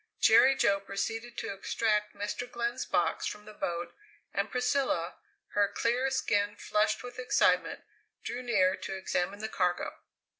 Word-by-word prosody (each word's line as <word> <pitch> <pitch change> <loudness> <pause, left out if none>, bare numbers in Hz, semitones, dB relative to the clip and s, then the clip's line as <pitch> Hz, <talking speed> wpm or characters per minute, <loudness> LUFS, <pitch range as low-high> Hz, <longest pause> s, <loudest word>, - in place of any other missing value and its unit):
Jerry 270 +1 +6
Jo 200 -5 +3
proceeded 225 +4 -4
to - - -3
extract 210 +1 0
Mr. 205 +4 -4
Glenn's 240 +2 -2
box - - +1
from 210 0 -6
the 215 - -11
boat, 175 -3 -3 0.4
and - - -1
Priscilla, 250 -9 0 0.3
her 205 -1 +2
clear 240 +5 +1
skin 205 -6 +1
flushed 215 +2 0
with 245 0 -8
excitement, 250 - +2 0.4
drew 240 +2 -4
near 190 -7 +3
to 195 - -5
examine 190 +1 -2
the 220 - -2
cargo. 180 -4 -1
210 Hz, 145 wpm, -30 LUFS, 200-240 Hz, 0.4 s, Jerry